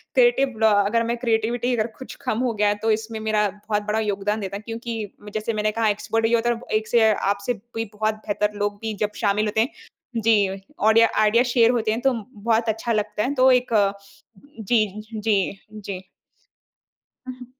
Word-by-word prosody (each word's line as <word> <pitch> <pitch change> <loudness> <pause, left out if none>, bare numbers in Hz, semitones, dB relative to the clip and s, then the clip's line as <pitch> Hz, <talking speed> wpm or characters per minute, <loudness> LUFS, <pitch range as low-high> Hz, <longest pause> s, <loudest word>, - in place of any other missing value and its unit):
Creative 275 - +3
अ, 215 - +4
अगर 230 +3 +1
मैं 235 - -1
creativity 235 +1 0
अगर 220 -1 0
कुछ 260 - -9
कम 220 - 0
हो 235 - -1
गया 210 0 +1
है 205 - +1
तो 225 - +3
इसमें 220 +1 -2
मेरा 215 -1 +1
बहुत 210 +1 -3
बड़ा 215 +1 +1
योगदान 210 0 -1
देता 195 0 -4
है - - -10
क्योंकि 225 -2 -5 0.2
जैसे 215 +1 -2
मैंने 215 0 0
कहा 220 0 +1
एक्सपर्ट 225 +2 0
होता, 235 0 0 0.2
एक 215 0 -5
से 225 -2 +4
आपसे 200 +4 -1 0.2
भी 225 0 -1
बहुत 215 +1 0
बेहतर 210 0 -1
लोग 205 0 -1
भी 220 -1 -3
जब 210 - -6
शामिल 210 0 +2
होते 215 +1 +1
हैं 235 - +1 0.5
जी, 210 -3 +3 0.3
ऑडियो 220 +2 +5
आइडियाज़ 230 +4 +4
शेयर 235 -1 +4
होते 225 -3 0
हैं 225 +2 -2
तो 270 0 +3 0.2
बहुत 225 +2 0
अच्छा 225 +2 -2
लगता 210 0 -1
है। 270 - -1
तो 260 0 +5
एक 250 -2 +2 0.9
जी, 220 +1 +2 0.3
जी, 205 -3 0
जी। 195 -3 -7 1.2
हुँ। 255 -1 -8
220 Hz, 185 wpm, -23 LUFS, 210-235 Hz, 1.2 s, ऑडियो